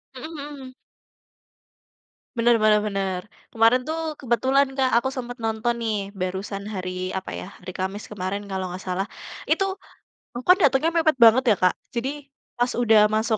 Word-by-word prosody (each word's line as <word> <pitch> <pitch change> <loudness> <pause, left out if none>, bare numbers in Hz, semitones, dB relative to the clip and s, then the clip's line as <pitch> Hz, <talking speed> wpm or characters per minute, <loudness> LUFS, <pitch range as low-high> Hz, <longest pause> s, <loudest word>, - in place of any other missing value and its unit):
Mhm 315 +6 -8 0.2
mhm. 255 -1 -10 1.6
Bener 235 0 +4
bener 215 -1 +4
bener. 195 -3 -2 0.3
Kemarin 230 +3 +4
tuh 320 0 -2
kebetulan, 260 +3 +2
Kak, 260 -1 +2
aku 265 +3 +1
sempat 245 -2 -6
nonton 225 +1 -1
nih, 210 -4 -2
barusan 195 +1 -4
hari 185 -1 -4
apa 190 - -4
ya, - - -6
hari 180 +1 -7
Kamis 190 +2 -4
kemarin 200 0 -3
kalau 190 -1 -2
nggak 185 +1 -7
salah. 185 +1 -2 0.4
Itu, 390 0 +1 0.6
aku 245 - -5
kan 365 - +8
datangnya 285 +1 +4
mepet 315 -4 +2
banget 235 +2 +7
ya, - - +4
Kak. 180 - +5 0.2
Jadi 275 +4 -4 0.3
pas 245 +1 +1
udah 225 -3 +5
masuk 220 0 +1
225 Hz, 155 wpm, -24 LUFS, 195-255 Hz, 1.6 s, kan